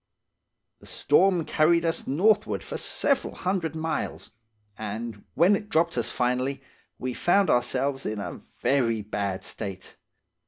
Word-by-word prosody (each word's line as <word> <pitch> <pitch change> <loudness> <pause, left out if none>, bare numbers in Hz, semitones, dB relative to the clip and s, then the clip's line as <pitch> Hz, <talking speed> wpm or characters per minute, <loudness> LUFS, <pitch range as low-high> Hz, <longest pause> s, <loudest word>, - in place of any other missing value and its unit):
"The - - -15
storm 175 +2 +3
carried 170 +2 +3
us 165 - -1
northward 210 +9 +2
for - - -6
several 280 -2 0
hundred 180 -4 -1
miles, 160 0 -3 0.4
and 110 0 -6
when 175 +6 +5
it 210 +1 -5
dropped 165 +1 +2
us 120 - 0
finally, 130 +2 -1 0.3
we 130 0 -3
found 195 +7 +3
ourselves 135 +2 +1
in 110 - -3
a 100 - -6 0.2
very 115 -6 +2
bad 100 -2 -3
state. 95 -3 -6
140 Hz, 130 wpm, -26 LUFS, 115-170 Hz, 0.4 s, when